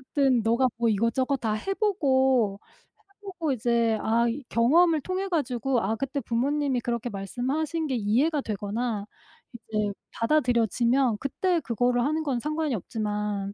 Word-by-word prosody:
어쨌든 270 -4 +3
너가 235 +3 +3
뭐 235 -1 +2
이것저것 230 +6 +1
다 225 -3 -1
해 230 - -2
보고, 265 - +2 0.4
해 395 -2 -32
보고 370 -6 -3
이제 235 -2 +1
아 230 +2 +2
이 255 +4 -3
경험을 315 +7 +4
통해 375 +5 -3
가지고 270 - 0
아 215 +4 0
그때 275 +4 -3
부모님이 270 +2 0
그렇게 235 0 -2
말씀하신 270 - -2
게 260 - -1
이해가 255 +9 +1
되거나 210 0 -3 0.5
이제 215 -3 -3 0.2
받아들여지면 240 -2 +2
그때 345 +6 0
그거를 245 +1 +1
하는 310 +4 0
건 270 -5 -1
상관이 305 0 -1
없지만 210 -1 -3
245 Hz, 320 characters per minute, -26 LUFS, 225-290 Hz, 0.5 s, 경험을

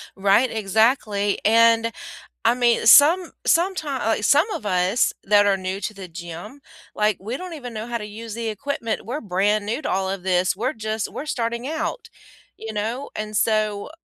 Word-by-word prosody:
Right, 200 +6 +3
exactly, 215 -1 +1
and, 230 +1 +4 0.5
I 230 - +5
mean, 240 -1 +2
some 325 +7 +6
sometime 330 -6 +1
like, 225 -2 0
some 295 - +4
of 220 - -5
us, 185 +3 +1
that 205 0 +4
are 200 -1 +2
new 185 +1 -4
to 215 - -4
the 195 -2 -9
gym, 175 +9 -9 0.3
like, 210 -2 +1
we 220 +6 -5
don't 365 +1 -8
even 250 -6 -8
know 220 +1 -5
how 240 -1 -2
to 210 - -7
use 220 +1 -8
the 230 +1 -4
equipment. 225 +1 -4
We're 255 +6 -4
brand 205 +2 0
new 235 +7 -2
to - - -3
all 190 0 -1
of 190 -1 -4
this, 185 0 +1
we're 240 +7 -2
just 220 -1 -4
we're 290 - -6
starting 235 -3 -3
out, 320 +9 -4 0.5
you 225 - -7
know? 225 +6 -3
And 215 0 -5
so, 215 -2 0
220 Hz, 185 wpm, -22 LUFS, 205-245 Hz, 0.5 s, some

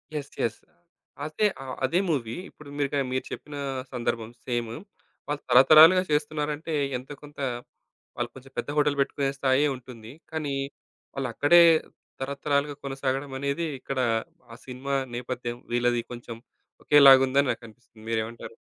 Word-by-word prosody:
Yes. 145 -2 -5
Yes. 115 -1 -1 0.7
అదే 155 +8 0 0.2
ఆహ్, 130 - -7
అదే 170 +7 +1
మూవీ 120 -8 -1
ఇప్పుడు 150 -2 -14
మీరు 140 -1 0
గ - - +1
మీరు 130 - -1
చెప్పిన 150 0 -7 0.4
సందర్భం 115 -2 -2 0.2
సేమ్. 120 -2 -2 0.6
వాళ్ళు 145 0 -3
తరతరాలుగా 160 +7 +8
చేస్తున్నారంటే 150 +1 -1 0.2
ఎంతో 130 +3 -9
కొంత 145 0 -13 0.8
ఆళ్ళు 120 0 -1
కొంచెం 135 0 -13
పెద్ద - - -3
హోటల్ 145 -1 +2
పెట్టుకునే 140 0 0
స్థాయే 135 +2 +3
ఉంటుంది. 120 -3 -11 0.2
కానీ 155 -3 -2 0.6
వాళ్ళక్కడే 140 +6 +4 0.6
తరతరాలుగా 140 +1 -1
కొనసాగడమనేది 135 +2 -2
ఇక్కడ 130 0 -4 0.5
ఆ - - -9
సినిమా 135 +2 -4 0.2
నేపథ్యం 120 -1 -4 0.2
వీళ్ళది 120 0 +2
కొంచెం 120 -1 -8 0.5
ఒకేలాగుందని 135 -1 +7
నాకనిపిస్తుంది. 115 -1 -11
మీరేమంటారు? 115 +1 -4
135 Hz, 120 wpm, -26 LUFS, 120-145 Hz, 0.8 s, తరతరాలుగా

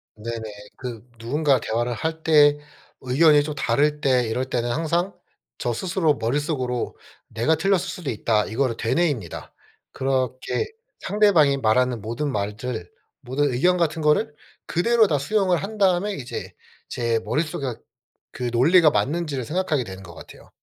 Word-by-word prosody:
네네. 115 +2 -5 0.4
그 120 -2 -7
누군가 135 +3 +1
대화를 120 +2 -1
할 160 +7 -4
때 145 -2 +5 0.4
의견이 145 +3 +4
좀 150 0 -4
다를 150 +4 +1
때 125 -4 +2
이럴 125 +4 -1
때는 120 -1 -1
항상 170 +6 0 0.5
저 120 - -1
스스로 165 - 0
머릿속으로 130 0 -2 0.3
'내가 115 +8 +1
틀렸을 195 +4 +2
수도 175 -5 -5
있다' 110 -1 +1
이거를 120 +1 -1
되뇌입니다. 120 - -1 0.4
그렇게 130 - -1 0.3
상대방이 185 -9 +3
말하는 125 0 +1
모든 120 +7 -3
말들, 105 -1 -4 0.3
모든 135 +2 0
의견 180 +9 +3
같은 165 -1 0
거를 150 +3 +2 0.3
그대로 225 +6 +3
다 150 -5 +1
수용을 185 +4 +1
한 215 +2 -6
다음에 195 +1 +2
이제 130 -8 -6 0.4
제 115 -1 0
머릿속에 145 -6 -2 0.5
그 125 -1 -3
논리가 155 +8 +5
맞는지를 145 +3 -1
생각하게 160 -4 0
되는 95 -4 -9
것 85 -3 -12
같아요. - - -14
140 Hz, 315 characters per minute, -23 LUFS, 120-165 Hz, 0.5 s, 때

